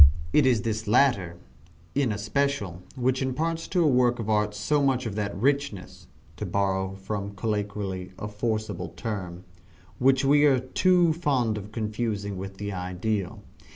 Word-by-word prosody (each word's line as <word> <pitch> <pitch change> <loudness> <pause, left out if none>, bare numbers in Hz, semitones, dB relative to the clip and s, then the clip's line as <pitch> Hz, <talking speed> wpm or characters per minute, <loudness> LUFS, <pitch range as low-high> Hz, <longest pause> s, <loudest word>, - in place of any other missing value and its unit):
It 145 -3 +5
is 120 -6 +3
this 110 -1 -2
latter, 100 -7 +3 0.6
in 135 -5 +1
especial, 105 -3 -1
which 130 0 0
imparts 160 +5 -1
to 180 -2 +2
a - - +4
work 125 -3 +3
of 110 -1 -2
art 105 -1 +1
so 145 +8 +1
much 135 -2 +1
of 110 - -3
that 100 -1 -3
richness 140 -5 -1 0.3
(to - - -4
borrow 95 -1 0
from 100 +1 -5
colloquy 100 -3 -3
a 105 - -5
forcible 110 +1 -3
term), 95 -6 -5 0.6
which 130 +1 +4
we 145 +2 +5
are 140 -3 +5
too 170 +6 +3
fond 135 -9 +1
of 105 0 -7
confounding 105 -2 -2
with 95 +1 -7
the 100 0 -4
ideal. 90 +2 -3
110 Hz, 155 wpm, -26 LUFS, 100-130 Hz, 0.6 s, It